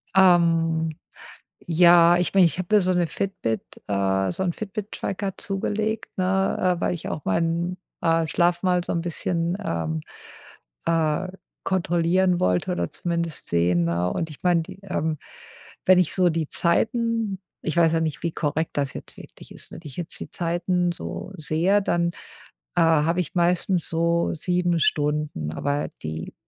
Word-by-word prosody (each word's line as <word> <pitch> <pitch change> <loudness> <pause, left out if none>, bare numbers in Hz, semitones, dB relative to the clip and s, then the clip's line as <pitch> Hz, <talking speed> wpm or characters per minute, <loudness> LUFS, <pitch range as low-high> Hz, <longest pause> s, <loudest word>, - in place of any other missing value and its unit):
Ähm, 165 -3 +4 0.7
ja, 170 0 +6
ich 180 - -1
mein, 195 -2 +6
ich 165 -3 +2
habe 185 +4 +1
mir 210 - +6
so 185 0 +1
‘ne 175 -1 +1
Fitbit, 155 - -2 0.3
äh 95 -1 +1
so 190 - -3
'n 175 - 0
Fitbit 210 +1 -6
Tracker 195 0 -4
zugelegt, 215 +3 -3
ne, 185 -1 +1
äh, - - -9
weil - - +1
ich 170 - -6
auch 150 - -4
meinen, 170 - 0 0.2
äh, 165 -1 +2
Schlaf 175 +2 +1
mal 180 -1 +2
so - - -4
'n 170 - 0
bisschen, 170 +1 -1
ähm, 80 -1 -2 0.8
äh, 165 +2 +1 0.3
kontrollieren 180 0 +1
wollte 90 - +1
oder 180 - -1
zumindest 170 -2 -3
sehen, 85 0 +2
ne, 85 +1 0
und, 165 - -2
ich 150 - -13
meine 175 -2 +3
die, 165 - -10
ähm 160 -5 -2 0.7
wenn 185 -1 +6
ich 180 - +1
so 180 -2 +4
die 160 -2 -1
Zeiten 225 +2 +1 0.2
ich 160 +1 -2
weiß 165 -2 +5
ja 165 - +2
nicht, 155 -4 -3
wie 170 - 0
korrekt 155 +1 -1
das 140 -2 0
jetzt - - -9
wirklich - - -13
ist - - -13
wenn - - -8
ich 145 -5 -9
jetzt 175 - -4
die - - -7
Zeiten 175 +1 0
so 185 +2 -6
sehe, 170 +6 +2
dann, 170 -2 0 0.6
äh, 175 - +3
habe 165 +2 +3
ich 175 - -7
meistens 175 +1 +1
so 170 +1 +1
7 175 +1 0
Stunden, 150 - 0
aber 145 - -1 0.2
die 80 +1 -5
170 Hz, 165 wpm, -24 LUFS, 155-180 Hz, 0.8 s, ja